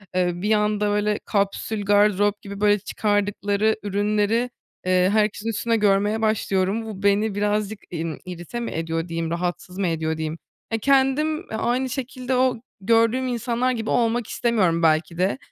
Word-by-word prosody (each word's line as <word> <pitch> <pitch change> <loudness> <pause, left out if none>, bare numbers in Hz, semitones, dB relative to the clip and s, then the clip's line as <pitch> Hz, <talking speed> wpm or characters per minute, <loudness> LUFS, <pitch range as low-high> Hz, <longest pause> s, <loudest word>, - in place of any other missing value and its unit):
eee, 180 -1 +2
bir 200 +5 -2
anda, 210 -1 +1
böyle, 210 0 0
kapsül 205 +1 -1
gardırop 205 0 +3
gibi, 200 -2 -8
böyle, 205 0 +4
çıkardıkları 205 +1 0
ürünleri, 210 +4 +1 0.4
eee, 185 0 +3
herkesin 215 0 +1
üstünde 230 +1 0
görmeye 205 +1 +2
başlıyorum. 215 -1 0
Bu, 205 -3 -8
beni 200 +1 +2
birazcık, 210 0 -1
imm, 165 -2 -4
irite 180 +5 -6
mi 235 - -4
ediyor 165 +1 -2
diyeyim, 165 -1 -3
rahatsız 180 +1 -3
mı 195 -2 0
ediyor 160 -1 -1
diyeyim? 160 0 -3 0.3
E, 225 - 0
kendim, 275 +4 +2
eee, 340 -11 -8
aynı 250 +3 0
şekilde 255 0 -3
o 255 -1 +2 0.2
gördüğüm 230 +4 +3
insanlar 245 +1 0
gibi 225 -3 -3
olmak 235 -1 +1
istemiyorum 185 -8 +1
belki 160 +1 +2
de. 185 +6 +1
210 Hz, 155 wpm, -23 LUFS, 185-230 Hz, 0.4 s, böyle